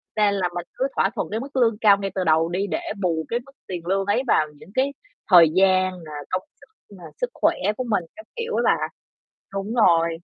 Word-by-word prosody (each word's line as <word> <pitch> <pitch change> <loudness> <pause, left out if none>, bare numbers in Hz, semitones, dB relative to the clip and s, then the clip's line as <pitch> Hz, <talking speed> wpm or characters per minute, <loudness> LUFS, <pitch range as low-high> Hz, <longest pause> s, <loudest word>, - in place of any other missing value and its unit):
Nên 210 -1 +3
là 185 -3 0
mình 175 0 -4
cứ 265 - -1
thỏa 195 - +2
thuận - - -2
cái 220 - -1
mức 275 +2 -8
lương 230 -4 +3
cao 205 -2 +6
ngay 195 -1 -4
từ 185 - 0
đầu 160 +1 +3
đi 195 +3 -1
để 320 - -2 0.2
bù 165 -3 0
cái 235 - 0
mức 275 - -17 0.2
tiền 175 -3 -6
lương 195 +1 +1
ấy 205 +6 +1
vào 155 - +3
những 160 - -15
cái 275 +2 +1 0.4
thời 170 -3 +8
gian 185 -2 +3
nà, 155 - -10 0.2
công 185 0 -1 0.2
sức 435 - -19
nà, 175 - -14 0.2
sức 250 - 0
khỏe - - +2 0.2
của 255 - -2
mình 205 -5 +1
các 325 - -12
kiểu 465 0 -4
ấy - - +1
bà. - - +4 0.8
Đúng 200 +3 -3
rồi. 170 -8 +4
195 Hz, 235 wpm, -23 LUFS, 175-230 Hz, 0.8 s, thời